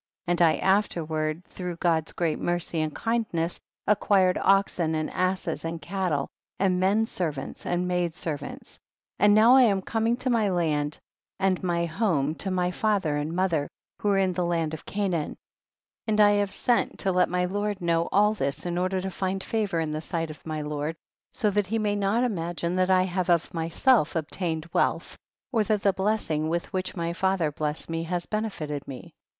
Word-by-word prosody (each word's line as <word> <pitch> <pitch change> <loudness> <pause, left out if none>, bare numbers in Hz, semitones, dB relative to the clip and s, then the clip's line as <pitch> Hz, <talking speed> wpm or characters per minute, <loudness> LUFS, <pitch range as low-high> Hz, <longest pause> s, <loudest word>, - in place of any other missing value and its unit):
5. 175 - -1
And 175 0 +1
I 160 -2 +5
afterward 165 -4 0
through 180 -2 -6
God's 165 -2 +1
great 165 -3 -1
mercy 175 -2 -1
and 155 -1 -2
kindness 215 -8 -1 0.3
acquired 195 -3 +3
oxen 190 -4 +2
and 155 0 -2
asses 185 +1 -1
and 165 0 -3
cattle, 170 -3 -1 0.3
and 185 -2 +2
men 200 +4 +3
servants 155 -10 -4
and 175 +1 0
maid 175 -2 0
servants. 150 -5 -5
6. - - -14 0.4
And 205 0 +6
now 225 +3 +7
I 265 - +8
am 200 -6 +3
coming 225 +3 0
to 255 0 -1
my 220 -4 +2
land 155 -5 0 0.4
and 190 -2 +1
my 170 -2 0
home 160 -5 0
to 195 - -2
my 180 -1 0
father 195 -7 +1
and 145 +2 -2
mother, 170 -6 +1 0.3
who 205 - 0
arc 195 -1 +3
in 185 -1 +1
tlie 175 -1 -1
land 165 -2 0
of 160 - -8
Canaan; 185 -7 -1 0.7
and 215 -1 +1
I 205 -1 +7
have 205 -1 +1
sent 240 -1 0
to 195 - +1
let 180 0 +3
my 180 0 +1
lord 205 +2 -2
know 170 -1 +1
all 210 +2 +4
this 140 -8 -3
in 175 0 -1
order 185 +1 0
to 190 0 -4
find 190 +1 -2
favor 210 -6 -1
in 160 -2 -1
the 155 0 -3
sight 165 -1 -3
of 155 - -13
my 155 -1 -3
lord, 150 +1 -3 0.4
so 215 -4 0
that 205 -1 +1
he 225 +4 0
may 210 -2 0
not 205 +4 +1
imagine 175 -5 -2
that 185 0 +2
I 185 -1 +5
have 185 -1 -2
uf 170 -1 +2
w?/.?e//" 165 - +2
obtained 160 0 -2
wealth, - - 0 0.4
or 230 -5 +2
tiiat 210 -1 +1
the 200 - +4
blessing 190 -7 0
with 170 +1 -2
which 185 0 -2
my 170 -1 -2
father 185 -4 +1
bless 150 +1 -2
ed - - -9
me 165 0 -1
has 175 0 -2
benefited 155 -10 -3
me. 135 -2 -9
180 Hz, 195 wpm, -26 LUFS, 165-200 Hz, 0.7 s, I